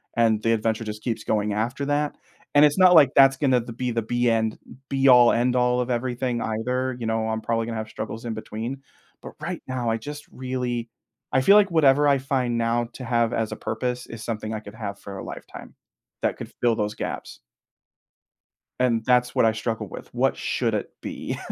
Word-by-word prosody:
and 110 -2 +3
the 115 - +2
adventure 110 +1 0
just 105 -1 -7
keeps 115 -3 -2
going 105 -1 0
after 120 +6 -2
that, 145 +1 -1 0.4
and 145 +1 +7
it's 145 +4 +2
not 185 -1 +7
like 140 -4 +7
that's 135 -1 +6
gonna 130 -4 +2
th 115 0 -9
be 125 -1 -1
the 115 0 0
be 120 +2 0
end 110 -1 0 0.3
be-all 130 -3 +6
end-all 125 +1 +2
of 125 0 -1
everything 125 0 -1
either, 125 +4 -1
you 115 - -4
know, 110 0 0
I'm 110 0 -2
probably 115 0 -1
gonna 115 -1 -4
have 110 0 -5
struggles 115 +1 -6
in 115 - -2
between. 115 +5 -6 0.4
But - - -9
right 170 +3 -5
now, 125 -2 -2
I 115 - +1
just 145 +6 -8
really 125 -2 -3 0.4
I 130 - +3
feel 200 +10 +6
like 205 -3 +5
whatever 145 -3 +4
I 140 -1 +4
find 130 -3 -1
now 115 0 0
to 130 - -8
have 115 -1 +1
as 110 -1 -1
a - - -3
purpose 125 +2 -3
is 115 -1 -8
something 110 -1 -4
I 110 - -3
could 105 0 -12
have 100 -3 -6
for 100 -1 -8
a - - -6
lifetime, - - -10 0.5
that - - 0
could - - -8
fill 120 -2 +3
those 105 -1 -1
gaps. - - -6 1.4
And 120 -3 +2
that's 125 -1 +3
what - - +3
I 110 - +4
struggle 110 +1 -3
with. - - -10
What - - +1
should - - -1
it - - -2
be? - - -5
120 Hz, 205 wpm, -24 LUFS, 110-130 Hz, 1.4 s, and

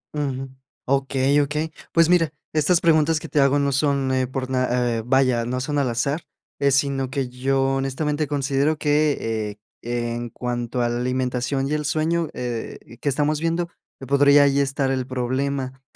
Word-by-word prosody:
Ujú. 135 -2 -2 0.4
Okey, 135 +1 +2
okey. 150 +3 -2 0.2
Pues, 165 -1 +4
mira, 165 -4 +3 0.2
estas 160 +3 +3
preguntas 160 -1 +3
que - - -9
te 150 - +1
hago 140 +1 +4
no 140 0 +1
son, 140 -1 +1
eh, 130 -1 +1
por 130 0 -4
na 125 -2 +1
eh, - - -3
vaya, 130 -1 +2
no 125 +1 -2
son 145 +2 -1
al 130 -3 +1
azar, 140 +7 -1 0.4
eh, 140 - +3
sino 135 -1 +1
que 135 -2 -2
yo 135 +2 0 0.2
honestamente 145 +3 -1
considero 140 +1 0
que, 115 -9 0 0.2
eh, 120 0 -2
en 120 0 -5
cuanto 120 +1 -3
a 120 - +1
la 120 - -1
alimentación 125 +2 -1
y 150 - -2
el 150 0 -1
sueño, 160 +2 0
eh, 120 -2 -4 0.2
que 145 - 0
estamos 150 +2 +1
viendo, 165 +1 -1 0.3
que 135 - -8
podría 140 +1 +5
ahí 140 0 +3
estar 135 -1 0
el 130 -1 -2
problema. 130 +1 -2
135 Hz, 175 wpm, -23 LUFS, 125-145 Hz, 0.4 s, podría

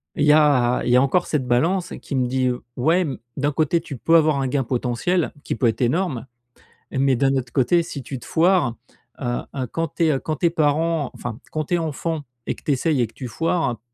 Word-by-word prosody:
...il 150 - +1
y - - +7
a 140 -5 +4
il 120 - +1
y - - +5
a 125 - +6
encore 155 +7 +2
cette 135 -5 -1
balance 170 +10 +1
qui - - -8
me 130 -2 +1
dit: 130 0 +1 0.3
«Ouais, 160 +8 +3
mmh, 140 - -4 0.2
d'un 145 +1 +1
côté, 165 +3 +1
tu 145 -5 -8
peux 165 +8 +2
avoir 155 -3 +4
un 135 - 0
gain 135 +1 0
potentiel, 130 +8 0
qui - - -3
peut 115 - -1
être 115 +1 -1
énorme. 130 0 0 0.6
Mais 135 -1 +2
d'un 135 +1 +2
autre 125 -2 -2
côté, 170 +7 +3
si 140 -4 -7
tu 130 +2 -6
te - - -13
foires, 170 -7 +2 0.4
heu - - -5 0.3
heu, 130 -2 -2
quand 165 -2 -2
tu 170 - +3
es 145 -4 +2
quand 155 -2 -3
tu 170 - -1
es - - +5
parents, 160 -2 +1
enfin, 115 -2 -6
quand 155 -1 -2
tu 175 - -4
es - - +2
enfant 160 0 -2 0.3
et - - -1
que - - -18
tu - - 0
essayes 140 0 +1
et 120 - +1
que 110 - -21
tu 130 - -7
foires, 165 -1 -1
145 Hz, 240 wpm, -22 LUFS, 125-165 Hz, 0.6 s, y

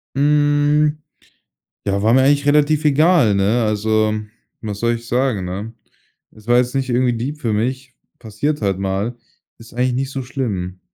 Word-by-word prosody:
Hm, 145 +1 +2 0.9
ja, 100 0 0
war 110 +2 +3
mir 130 +1 +5
eigentlich 145 +1 +3
relativ 150 +1 +3
egal, 150 - +4
ne? 100 +5 +1
Also, 110 0 +1 0.5
was 105 -2 -6
soll 120 0 +1
ich 115 0 -10
sagen, 120 -6 0
ne? 100 +5 -6 0.6
Das 110 +1 -19
war 120 0 +4
jetzt 125 +1 0
nicht 135 -1 -1
irgendwie 125 0 +1
deep 135 +6 -4
für 115 -6 -1
mich, 130 +4 -3 0.2
passiert 120 +7 -3
halt 100 -3 0
mal. 100 +5 -2 0.4
Ist 115 0 -15
eigentlich 125 +1 0
nicht 135 +2 -2
so 135 - -4
schlimm. 105 -9 -4
120 Hz, 165 wpm, -19 LUFS, 110-140 Hz, 0.9 s, mir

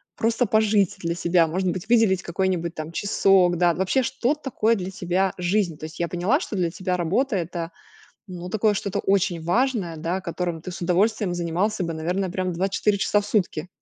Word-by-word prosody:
просто 230 +2 +1
пожить 210 -3 +2
для 170 0 -2
себя, 170 -1 +3
может 185 +3 -1
быть 175 0 -4
выделить 220 -6 +4
какой-нибудь 175 -1 -1
там 155 0 -6
часок, 190 -1 +3
да? 175 0 +3
Вообще, 190 - +1
что 265 +3 0
такое 240 -6 0
для 185 -3 -4
тебя 185 +1 0
жизнь? 180 -2 0
То 155 - -7
есть 160 +1 -10
я 170 - 0
поняла, 180 - +1
что 275 - -5
для 175 -2 +1
тебя 185 +1 -2
работа 200 +9 0
это, 170 -1 -4 0.6
ну, 180 -1 -7
такое, 215 +2 +2
что-то 200 -1 -2
очень 190 -3 +1
важное, 205 -2 0
да 170 +4 -2
которым 175 -2 -3
ты 185 - -7
с 175 - -7
удовольствием 190 +2 +1
занимался 175 +4 -1
бы, 165 -1 -3
наверное, 180 +4 -2
прям 185 +1 -2
24 195 +3 0
часа 205 +1 +2
в - - -8
сутки. 185 -6 -1
185 Hz, 190 wpm, -24 LUFS, 170-205 Hz, 0.6 s, выделить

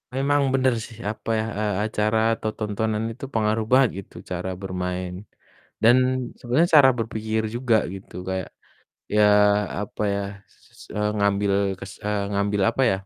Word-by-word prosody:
memang 145 +2 +2
bener 130 -2 +3
sih, 115 - -13
apa 110 +1 -9
ya, 110 - -1
eee, 105 -2 0
acara 110 +1 0 0.2
atau 110 -1 -3
tontonan 110 +1 -1
itu 130 +4 -8
pengaruh 110 0 +1
banget, 130 -2 +6
gitu, - - -25 0.2
cara 90 +1 -3
bermain. 90 -1 -3 0.7
Dan 120 +3 +7 0.4
sebenernya 140 +8 +2
cara 135 -1 +7
berpikir 110 0 -2
juga 120 -2 +2 0.2
gitu, 95 0 -11
kayak, 95 -2 -3 0.7
ya, 105 - +5 0.6
apa 105 - -6
ya, 100 - -1 0.3
s - - -20
eee, 105 0 +1
ngambil 100 0 +1 0.3
kes 100 - -8
eee, 105 -1 0
ngambil, 100 0 0
apa 135 - -1
ya, 95 - +1
110 Hz, 150 wpm, -24 LUFS, 100-115 Hz, 0.7 s, Dan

